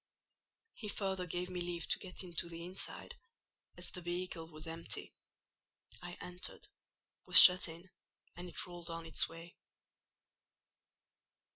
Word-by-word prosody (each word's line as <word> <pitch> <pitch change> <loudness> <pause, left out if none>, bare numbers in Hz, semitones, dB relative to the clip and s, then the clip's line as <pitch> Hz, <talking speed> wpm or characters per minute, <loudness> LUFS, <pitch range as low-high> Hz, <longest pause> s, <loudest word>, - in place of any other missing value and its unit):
He 215 - -8
further 190 -3 -3
gave 180 +1 -4
me 180 -1 -5
leave 175 -1 -4
to - - +1
get 185 0 -5
into 170 -1 -4
the 170 0 -8
inside, 185 +2 -5 0.6
as - - -6
the 180 - -8
vehicle 175 -1 -5
was 155 +1 -9
empty: 165 +1 -6 0.9
I 175 0 -8
entered, 180 +1 -4 0.6
was - - +12
shut 180 0 +10
in, 170 +3 -11 0.5
and 175 0 -8
it - - -3
rolled 175 -1 -7
on 165 0 -6
its 160 - +1
way. 165 +1 -12
175 Hz, 135 wpm, -34 LUFS, 165-180 Hz, 0.9 s, was